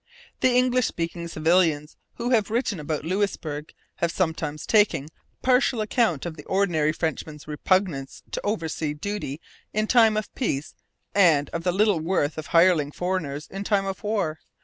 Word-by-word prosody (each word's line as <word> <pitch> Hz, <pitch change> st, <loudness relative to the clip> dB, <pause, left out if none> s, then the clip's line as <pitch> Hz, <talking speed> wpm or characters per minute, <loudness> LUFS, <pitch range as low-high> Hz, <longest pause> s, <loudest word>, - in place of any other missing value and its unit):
English 250 Hz, -1 st, +3 dB
speaking 170 Hz, 0 st, -4 dB
civilians 160 Hz, -2 st, +2 dB, 0.2 s
who 240 Hz, +1 st, -2 dB
have 220 Hz, -4 st, +3 dB
written 225 Hz, -4 st, -1 dB
about 150 Hz, 0 st, -3 dB
Louisbourg 165 Hz, -5 st, -2 dB, 0.3 s
have 170 Hz, -, 0 dB
sometimes 160 Hz, -4 st, -2 dB
taken 175 Hz, -9 st, +3 dB, 0.3 s
partial 255 Hz, -1 st, +3 dB
account 215 Hz, -, +1 dB
of 170 Hz, -2 st, -4 dB
the 150 Hz, -, -9 dB
ordinary 175 Hz, -6 st, +2 dB
Frenchman's 155 Hz, -2 st, -4 dB
repugnance 150 Hz, -2 st, 0 dB
to -, -, -3 dB
oversea 160 Hz, -7 st, -2 dB
duty 165 Hz, -4 st, -4 dB, 0.3 s
in 215 Hz, +1 st, +1 dB
time 225 Hz, -2 st, +5 dB
of 215 Hz, -, -4 dB
peace 155 Hz, -, -2 dB, 0.4 s
and 160 Hz, -8 st, +4 dB
of 170 Hz, -, -3 dB
the 180 Hz, -, +2 dB
little 200 Hz, -1 st, +3 dB
worth 160 Hz, -2 st, 0 dB
of 155 Hz, -, -7 dB
hireling 165 Hz, -4 st, +4 dB
foreigners 155 Hz, -5 st, -3 dB
in 195 Hz, +1 st, -4 dB
time 200 Hz, -1 st, +1 dB
of 195 Hz, 0 st, -4 dB
war. 195 Hz, -7 st, -1 dB
175 Hz, 150 wpm, -25 LUFS, 155-210 Hz, 0.4 s, time